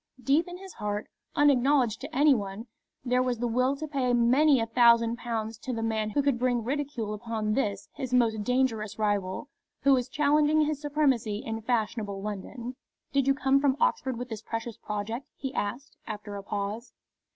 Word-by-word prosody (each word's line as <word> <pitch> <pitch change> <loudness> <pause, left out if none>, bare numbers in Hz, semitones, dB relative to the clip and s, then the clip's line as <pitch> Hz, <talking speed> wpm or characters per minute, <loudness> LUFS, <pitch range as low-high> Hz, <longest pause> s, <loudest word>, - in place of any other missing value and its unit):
Deep 295 +6 +3
in 355 0 -7
his 380 -1 -11
heart, 205 0 -3 0.3
unacknowledged 270 -4 +3
to 285 +4 -7
any 290 +1 +6
one, 205 -1 -4 0.4
there 250 0 +2
was 250 -1 0
the 240 - -2
will 255 +4 +1
to 310 +3 -5
pay 265 -4 0
many 260 +4 +4
a 225 - +1
thousand 235 0 +4
pounds 225 -2 -4
to 260 - -5
the 225 -1 -2
man 220 -1 0
who 285 - +1
would 275 -4 +1
bring 245 -2 +1
ridicule 260 -4 -2
upon 215 -1 -2
this 210 -5 -1
his 260 -2 -5
most 225 -4 +2
dangerous 225 -4 0
rival, 205 +2 -1 0.3
who 275 - +5
was 250 -2 +1
challenging 300 +1 +3
his 300 -1 0
supremacy 265 -8 +1
in 225 0 -3
fashionable 215 -3 -1
London. 215 +5 -6 0.4
"Did 275 -1 +2
you 275 - +4
come 270 +1 +3
from 275 -1 +2
Oxford 260 -3 +1
with 250 +1 -5
this 220 -2 -5
precious 225 0 -5
project?" 210 +5 -4
he 270 -1 -4
asked, 240 +8 -4
after 210 -1 -6
a 200 - -5
pause. 205 +4 -4
240 Hz, 185 wpm, -28 LUFS, 220-275 Hz, 0.4 s, any